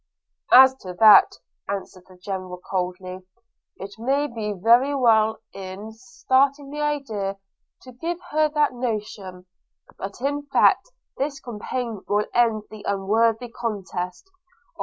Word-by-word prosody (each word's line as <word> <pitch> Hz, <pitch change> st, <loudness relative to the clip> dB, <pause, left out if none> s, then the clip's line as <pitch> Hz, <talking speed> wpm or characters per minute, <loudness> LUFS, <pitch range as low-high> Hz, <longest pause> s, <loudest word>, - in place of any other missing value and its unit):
'As 260 Hz, +1 st, +9 dB
to 185 Hz, -5 st, -9 dB
that,' 215 Hz, -2 st, +7 dB, 0.3 s
answered 190 Hz, -2 st, -6 dB
the 185 Hz, -, -17 dB
General 185 Hz, -1 st, -6 dB
coldly, 185 Hz, 0 st, -4 dB, 0.6 s
'it 200 Hz, +2 st, -9 dB
may 275 Hz, +5 st, +1 dB
be 225 Hz, -6 st, -4 dB
very 235 Hz, +8 st, +3 dB
well, 220 Hz, -4 st, +3 dB, 0.2 s
in 195 Hz, +3 st, -8 dB
starting 260 Hz, +4 st, 0 dB
the 295 Hz, +1 st, -5 dB
idea, 225 Hz, -10 st, -2 dB, 0.5 s
to 255 Hz, -, -12 dB
give 330 Hz, +8 st, -4 dB
her 310 Hz, 0 st, +2 dB
that 300 Hz, -2 st, +1 dB
notion; 210 Hz, -6 st, -5 dB, 0.5 s
but 195 Hz, +3 st, -7 dB
in 285 Hz, +2 st, -2 dB
fact 280 Hz, -, +3 dB, 0.3 s
this 275 Hz, 0 st, -2 dB
campaign 235 Hz, -2 st, -5 dB
will 205 Hz, +1 st, +1 dB
end 230 Hz, -3 st, +2 dB
the 215 Hz, -1 st, -10 dB
unworthy 225 Hz, +4 st, +1 dB
contest. 195 Hz, -, -5 dB
225 Hz, 125 wpm, -23 LUFS, 195-265 Hz, 0.6 s, As